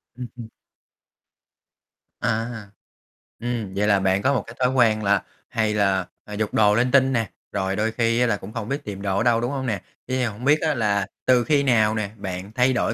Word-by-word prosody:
Ừm, 125 0 -6
ừm. 115 -2 -8 1.7
À - - 0 0.2
ha, 110 -4 -8 0.7
ừm, 115 -5 -3
vậy 105 +1 +1
là 100 -2 +4
bạn 95 +1 +1
có 140 - +2
một 125 -7 0
cái 115 - -10
thói 125 -1 +3
quen 110 -4 +3
là 100 -1 +2 0.3
hay 110 -2 0
là, 95 -3 +2 0.2
à, 105 - -9
giục 105 0 -2
đồ 105 -1 +4
linh 125 +3 +2
tinh 135 -1 +4
nè, 115 -3 0 0.2
rồi 95 -1 -1
đôi 110 +2 0
khi 115 +1 +1
á 125 - +4
là 110 -3 +1
cũng 100 +3 -10
không 115 0 -5
biết 140 +2 -2
tìm 100 -2 -6
đồ 100 -1 -1
ở 100 - +2
đâu, 120 -1 +3
đúng 120 +2 -1
hông 135 -2 -3
nè? 115 - 0 0.3
Thế 130 - -1
thì 130 - +1
hông 115 +1 -4
biết 150 +2 +4
á 155 -1 +1
là 100 -6 0 0.2
từ 125 -2 +4
khi 145 +1 +2
nào 110 -4 +3
nè 105 -2 -2
bạn 95 0 -6
thay 125 +1 +3
đổi 120 - 0
110 Hz, 230 wpm, -23 LUFS, 100-125 Hz, 1.7 s, là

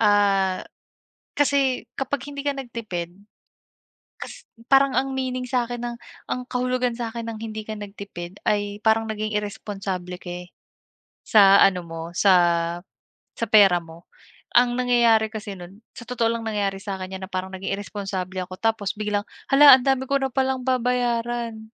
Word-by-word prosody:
ah, 200 -3 +3 0.8
kasi 275 -3 +2
kapag 270 0 -3
hindi 280 - -5
ka 285 -1 -1
nagtipid, 220 -9 -5 1.1
kas - - -9 0.2
parang 270 0 +5
ang 270 0 0
meaning 255 -1 -2
sa 245 -1 0
akin 240 0 -6
ng 240 0 -4 0.3
ang 250 - -1
kahulugan 250 -1 -1
sa 230 -1 -4
akin 230 0 -6
ng - - -8
hindi 215 -1 -6
ka 215 - -4
nagtipid 200 -3 -8
ay 205 -1 0
parang 220 0 +3
naging 215 0 -3
iresponsable 195 -3 -4
ka, 175 - -7
eh, 180 0 -6 0.8
sa 200 -2 +7
ano 185 -2 +4
mo 165 -1 -7
sa 195 +2 +4 1.1
sa 230 - -1
pera 205 -5 +6
mo. 165 +1 -15 0.5
Ang 245 0 +5
nangyayari 235 -3 +4
kasi 210 -2 -6
no'n 180 +4 -12 0.2
sa 235 - -9
totoo 235 -2 0
lang 230 0 -2
nangyari 205 -3 -1
sa 195 0 -5
akin 185 0 -6
'yan 190 - -14
na - - -18
parang 185 0 -3
naging 195 +1 -3
iresponsable 195 -2 -5
ako, 185 0 -7
tapos 220 -4 0
biglang, 210 0 -1 0.3
"Hala 280 0 +9
ang 260 - -1
dami 265 -1 +2
ko 275 - +2
na 270 - 0
palang 265 0 0
babayaran." 240 -3 -1
220 Hz, 165 wpm, -23 LUFS, 195-245 Hz, 1.1 s, Hala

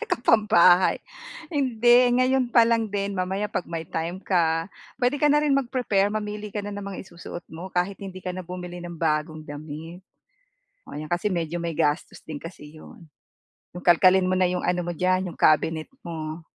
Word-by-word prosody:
Naka-pambahay. 210 - +4 0.5
Hindi, 245 -4 +4
ngayon 255 0 +2
pa 230 -1 +6
lang 225 -3 +1
din 200 0 -2
mamaya 190 +3 -1
'pag 180 - -3
may 165 -2 -6
time 170 +3 -3
ka, 165 -3 +1 0.3
puwede 250 +3 +2
ka 295 0 +3
na 295 - +4
rin 295 -2 +2
mag-prepare, 240 -7 +1
mamili 210 -1 -4
ka 210 - -2
na 205 - -6
ng 205 -1 -6
mga 200 -1 -6
isusuot 175 0 -8
mo, 175 +4 -9
kahit 180 +2 0
hindi 185 -1 -8
ka 180 0 -5
na 185 - -6
bumili 180 0 -7
ng 175 -2 -8
bagong 155 -1 0
damit. 155 +4 -8 0.9
Oo, - - -6
'yan 155 - -6
kasi 175 +5 -1
medyo 170 -2 -2
may 170 - -2
gastos 150 0 -1
din 155 - -5
kasi 155 0 -9
'yon. 160 +1 -14 0.7
Yung 180 - -7
kalkalin 185 +1 +5
mo 185 0 +1
na 185 - +4
yung 180 0 -2
ano 180 0 0
mo 175 - -3
diyan 185 +2 +1
yung - - -13
cabinet 155 +1 +3 0.2
mo. 160 -1 -6
185 Hz, 185 wpm, -25 LUFS, 165-210 Hz, 0.9 s, pa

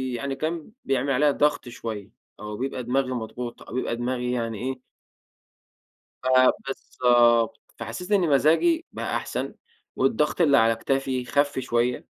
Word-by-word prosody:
يعني 135 +2 -3
كان 160 +4 -4
بيعمل 135 +1 0
عليَّ 145 +2 +4
ضغط 145 -3 +1
شوية 110 -4 -6 0.3
أو 105 0 -6
بيبقى 130 0 -3
دماغي 130 +2 0
مضغوط 120 0 -5
أو - - -11
بيبقى 125 -1 -1
دماغي 125 0 -2
يعني 115 -3 -2
إيه 130 0 -4 1.4
ف - - -7 0.4
بالضبط. 120 -3 +2 0.2
فحسيت 115 - -6
إن 200 - +5
مزاجي 165 - +3
بقى - - -3
أحسن، - - -3 0.4
والضغط 150 +5 +1
اللي 145 -5 +5
على 115 0 +4
كتافي 130 +1 -1
خَفْ 145 +2 +1
شوية، 120 -1 0
130 Hz, 140 wpm, -25 LUFS, 120-140 Hz, 1.4 s, إن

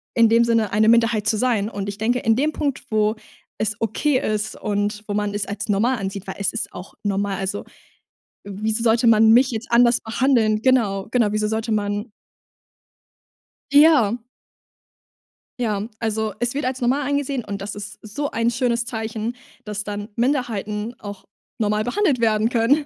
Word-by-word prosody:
in 230 -1 +5
dem 230 +1 +5
Sinne 230 -3 +1
eine 215 +2 +3
Minderheit 230 -2 +3
zu 220 - +2
sein. 220 -3 +1
Und 200 -2 -4
ich 200 - -6
denke, 235 +4 +1
in 225 -2 +2
dem 295 +5 +1
Punkt, 285 -3 -2
wo 215 0 +2 0.4
es 215 -1 -1
okay 255 +5 +1
ist 215 0 -2
und 205 0 -2
wo 205 - -3
man 205 -1 -1
es 205 -1 -2
als 205 +2 -5
normal 230 +6 +2
ansieht, 195 -1 -5
weil 190 - -5
es 200 - -1
ist 230 - -4
auch 180 +2 -9
normal. 200 -1 -1
Also, 195 +2 -3 0.8
wieso 215 +3 -3
sollte 230 +1 +3
man 220 -1 +6
mich 255 +3 +5
jetzt 225 0 -4
anders 240 0 +5
behandeln? 220 -2 +2
Genau, 220 -7 +2
genau. 235 -3 +3
Wieso 215 0 0
sollte 220 +1 -2
man 205 +1 -1 1.6
Ja. 285 -7 +5 1.4
Ja, 215 -3 -1
also 220 -1 -1
es 240 +2 -1
wird 290 - -1
als 260 +1 -2
normal 260 +3 +1
angesehen 280 -3 -1
und 200 -1 -5
das 200 +1 -5
ist 205 0 -8
so 280 +7 -4
ein 230 +1 +1
schönes 240 -1 0
Zeichen, 220 0 -4 0.3
dass 210 -1 -4
dann 205 0 -5
Minderheiten 230 -4 -1
auch 205 -2 -9 0.3
normal 210 -1 +1
behandelt 275 - +1
werden 220 -1 +2
können. 250 +6 +2
220 Hz, 170 wpm, -22 LUFS, 210-240 Hz, 1.6 s, man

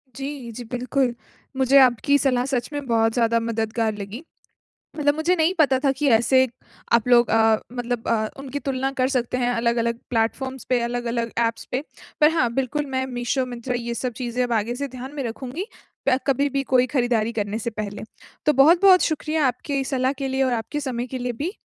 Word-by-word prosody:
जी, 270 -3 -6
जी, 240 +2 -7
बिल्कुल। 250 0 0 0.4
मुझे 265 +1 +4
आपकी 260 +3 +4
सलाह 255 -3 +1
सच 265 -1 -2
में 290 -1 -4
बहुत 225 -1 +2
ज़्यादा 230 -1 +2
मददगार 225 -1 -1
लगी। 210 +9 -7 0.7
मतलब 290 -1 +2
मुझे 315 +4 +1
नहीं 325 +3 +2
पता 270 -4 +4
था 275 - +4
कि 280 +1 0
ऐसे 260 +3 +3 0.5
आप 235 +1 +3
लोग 240 -1 +5
अ, 220 -1 +4
मतलब 245 -1 -3
अ, 220 -2 +1
उनकी 275 +1 -5
तुलना 270 -1 -2
कर 255 - +3
सकते 250 0 0
हैं, 245 -1 +1
अलग 235 0 +1
अलग 235 0 -1
प्लेटफ़ॉर्म्स 255 +3 -1
पे, 250 -1 +2
अलग 240 0 -2
अलग 235 -1 -2
ऐप्स 230 - -4
पे। 260 +3 -1 0.4
पर 300 - +6
हाँ, 250 -8 +1
बिल्कुल, 275 +3 -1
मैं 260 -1 -2
मीशो, 250 +2 0
मिंत्रा, 245 +1 -4
ये 235 0 -3
सब 250 0 -3
चीज़ें 240 +1 -1
अब 245 - -3
आगे 240 +3 -4
से 280 +2 -3
ध्यान 260 +2 -8
में 285 - -3
रखूँगी 260 - -5 0.4
प 260 - +4
कभी 280 +1 +2
भी 275 - +1
कोई 255 -1 +4
खरीदारी 240 -4 0
करने 210 0 -2
से 235 +1 -3
पहले। 210 -2 -5 0.4
तो 300 - +5
बहुत-बहुत 345 +7 +6
शुक्रिया 310 -2 0
आपकी 270 +2 -2
सलाह 260 0 0
के 275 -1 -4
लिए 265 0 0
और 260 -1 +1
आपके 235 +5 -3
समय 250 -3 -3
के 260 +1 -5
लिए 245 0 -2
भी। 360 +6 -3
255 Hz, 200 wpm, -23 LUFS, 235-275 Hz, 0.7 s, पर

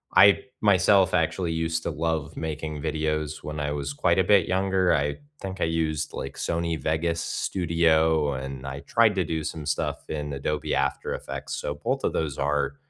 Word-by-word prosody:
I 100 0 +7 0.2
myself 95 -1 +4
actually 85 -3 +1
used 80 0 -1
to - - -2
love 80 -1 -2
making 80 -1 -4
videos 75 -1 -2
when 75 0 -5
I 75 0 -1
was 70 -1 -3
quite 85 +5 +2
a - - +5
bit 95 -2 +4
younger, 95 -1 +2
I 75 0 0 0.2
think 95 -1 -5
I - - +3
used, 80 -2 -1
like, 70 - -5
Sony 85 -1 -1
Vegas 85 +1 0
Studio 80 -4 +2
and 65 0 -6
I 70 0 -5
tried 110 +8 +3
to 95 - +2
do 80 0 -2
some 80 -1 -5
stuff 75 - -2
in 75 -1 -3
Adobe 75 +2 -2
After 70 0 -1
Effects, - - -5
so 75 - -3
both - - -2
of - - 0
those 75 -4 -2
are 70 -1 0
80 Hz, 180 wpm, -26 LUFS, 75-85 Hz, 0.2 s, I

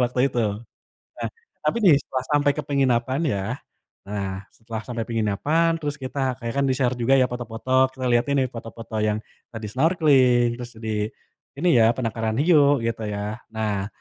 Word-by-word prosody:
waktu 125 +1 -1
itu. 120 - 0 0.8
Nah, - - -3 0.4
tapi - - +1
nih 175 -6 +8
setelah 130 -1 -4
sampai 145 -1 +4
ke 150 - -2
penginapan 130 -1 +1
ya, 100 - -2 0.7
nah 100 -1 -4
setelah 110 -1 -7
sampai 120 -2 -3
penginapan 115 +9 +1
terus 145 -2 -2
kita 130 +2 -4 0.2
kayak 115 0 -4
kan - - +2
di-share 130 -1 +1
juga 130 +3 +3
ya - - +5
foto-foto, 120 0 -6 0.2
kita 130 -1 -5
liatin 120 +4 +2
nih 130 - +1
foto-foto 115 -1 -8
yang 105 0 +1 0.4
tadi 110 -1 -6
snorkeling, 130 -5 +4
terus 120 -1 -7
di 105 -1 -1 0.5
ini 170 +6 0
ya, 110 - +6
penangkaran 115 -2 -2
hiu 145 -4 +5
gitu 115 -1 -2
ya. 105 +1 -4 0.2
Nah, 105 -3 -1
120 Hz, 165 wpm, -24 LUFS, 110-135 Hz, 0.8 s, nih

